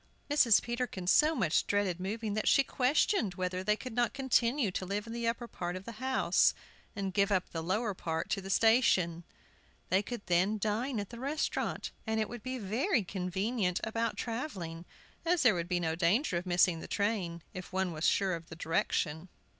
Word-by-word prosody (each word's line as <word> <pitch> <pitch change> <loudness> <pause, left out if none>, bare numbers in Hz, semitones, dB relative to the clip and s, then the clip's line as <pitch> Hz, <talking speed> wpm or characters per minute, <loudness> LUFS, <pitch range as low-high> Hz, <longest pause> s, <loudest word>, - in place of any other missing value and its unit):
Mrs. 245 -7 +5
Peterkin 240 -6 -3
so 305 - +4
much 185 - +1
dreaded 200 -4 0
moving 210 +3 -3
that 215 - -1
she 275 - +5
questioned 255 - +1
whether 185 0 -2
they 210 +2 +2
could 255 +2 -8
not 240 +1 +1
continue 255 -3 +2
to 185 - -3
live 200 +3 -3
in 230 - -7
the 235 0 -2
upper 235 +1 -2
part 175 -5 -4
of 185 +1 -7
the 235 - -6
house 260 0 +3 0.4
and 195 -2 -3
give 200 +1 +2
up 185 -2 0
the 165 - -3
lower 205 +6 -1
part 160 -3 -3
to 195 - 0
the 195 - -8
station. 195 -7 +3 0.7
They 185 +2 +3
could 235 0 -7
then 185 +4 +2
dine 220 +4 -1
at 205 +1 -5
the 235 - -8
restaurant, 285 +4 -2 0.2
and 220 0 0
it 215 - -1
would 240 -1 -7
be 255 +2 -4
very 235 - 0
convenient 190 +2 -1
about 230 +1 -1
travelling, 190 - -4 0.4
as 340 -1 +2
there 240 -4 +6
would 170 -2 -2
be 180 -1 +1
no 160 -2 -1
danger 175 - +1
of 175 +2 -2
missing 175 -1 +3
the - - -8
train, 190 -6 -1
if 185 +2 -8
one 190 -1 0
were 155 - -7
sure 190 +3 +2
of 165 -1 -6
the 160 - -8
direction. 160 +1 -1
205 Hz, 195 wpm, -31 LUFS, 180-235 Hz, 0.7 s, there